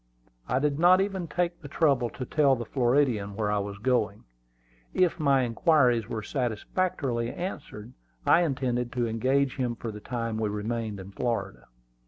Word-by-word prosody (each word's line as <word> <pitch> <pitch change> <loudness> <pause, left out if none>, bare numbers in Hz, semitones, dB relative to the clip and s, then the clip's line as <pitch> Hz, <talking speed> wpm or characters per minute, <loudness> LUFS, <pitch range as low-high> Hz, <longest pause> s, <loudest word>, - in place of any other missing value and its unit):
I 125 - +2
did 145 +1 0
not 180 +2 +6
even 195 -3 -1
take 175 +1 -2
the 145 - -8
trouble 140 -5 +2
to 130 - -6
tell 140 0 +3
the 120 -1 -5
Floridian 120 -6 +1
where 105 -1 -1
I 105 - +1
was 100 0 -5
going. 110 -2 0 0.7
If 180 -2 +2
my 140 -3 +3
inquiries 120 -2 +3
were 110 -2 -3
satisfactorily 125 - -1
answered, 145 - -6 0.3
I 170 - +5
intended 130 -6 -1
to 120 -1 0
engage 130 +4 +1
him 125 -3 -1
for 115 -1 -5
the 105 - -8
time 115 -1 -3
we 110 -1 0
remained 105 0 -3
in 95 +1 -9
Florida. 100 - -3
125 Hz, 165 wpm, -27 LUFS, 110-145 Hz, 0.7 s, not